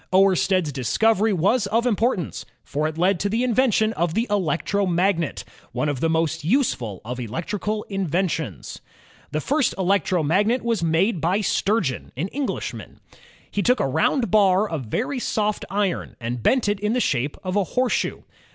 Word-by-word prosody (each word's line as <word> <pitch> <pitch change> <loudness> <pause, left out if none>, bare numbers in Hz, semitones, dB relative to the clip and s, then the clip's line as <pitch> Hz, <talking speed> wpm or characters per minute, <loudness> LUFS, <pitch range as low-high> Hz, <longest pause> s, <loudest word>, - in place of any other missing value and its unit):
Oersted's 185 -3 +3
discovery 215 - +2
was 200 +5 +2
of 230 +4 +1
importance, 220 - 0 0.2
for 150 +2 -1
it 155 0 -6
led 180 +1 +2
to 200 - 0
the 225 +4 0
invention 230 -3 +2
of 170 -4 -1
the 230 - +1
electromagnet, 180 -1 0 0.3
one 125 +5 -1
of 145 -3 -2
the 165 - +1
most 160 -2 0
useful 155 - 0
of 125 +2 -5
electrical 205 - -3
inventions. 175 - -3 0.5
The 155 - -1
first 285 - +1
electromagnet 190 - +1
was 230 -4 0
made 170 +3 +1
by 185 +5 +1
Sturgeon, 200 - 0
an 170 +8 -2
Enghshman. 285 -1 -4 0.5
He 205 - -1
took 250 +4 +3
a - - +1
round 160 - +1
bar 200 -1 +4
of 160 -9 -4
very 255 - -2
soft 215 -3 -1
iron 195 -1 -1
and 120 0 -4
bent 255 - +2
it 205 -1 0
in 210 +2 0
the 250 - +1
shape 140 - 0
ki^cteomaoket 185 - -8
of 185 - -2
a 200 - +3
horseshoe. 255 +6 -1
195 Hz, 160 wpm, -23 LUFS, 160-220 Hz, 0.5 s, bar